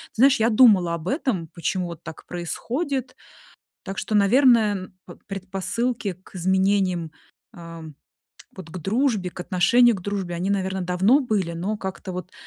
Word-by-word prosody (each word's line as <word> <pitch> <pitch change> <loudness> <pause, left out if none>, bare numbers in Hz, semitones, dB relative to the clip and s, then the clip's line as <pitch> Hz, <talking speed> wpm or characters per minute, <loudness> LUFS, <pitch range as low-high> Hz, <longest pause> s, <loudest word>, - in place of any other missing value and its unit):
знаешь, 265 +2 +5
я 230 - +4
думала 210 -8 +5
об 170 +1 -8
этом, 215 - -1
почему 180 +2 -2
вот 170 -1 -9
так - - -10
происходит. 255 - -4 0.7
Так 195 0 -7
что, 215 - -3
наверное, 225 +1 +5
н 185 0 -9
п 175 - -11
предпосылки 195 +3 -3
к - - -19
изменениям, 190 -2 +1 0.4
эм, 165 -3 -10 0.6
вот 180 -4 -10
к 185 - -6
дружбе, 210 - 0
к 180 - -13
отношению 225 +7 +4
к 190 - -8
дружбе, 195 -2 -3
они, 180 +3 -2
наверное, 190 -1 -1
давно 185 +9 +3
были. 210 - -1
Но 190 +6 -3
как-то 190 -1 -6
вот 180 0 -6
190 Hz, 155 wpm, -23 LUFS, 180-225 Hz, 0.7 s, знаешь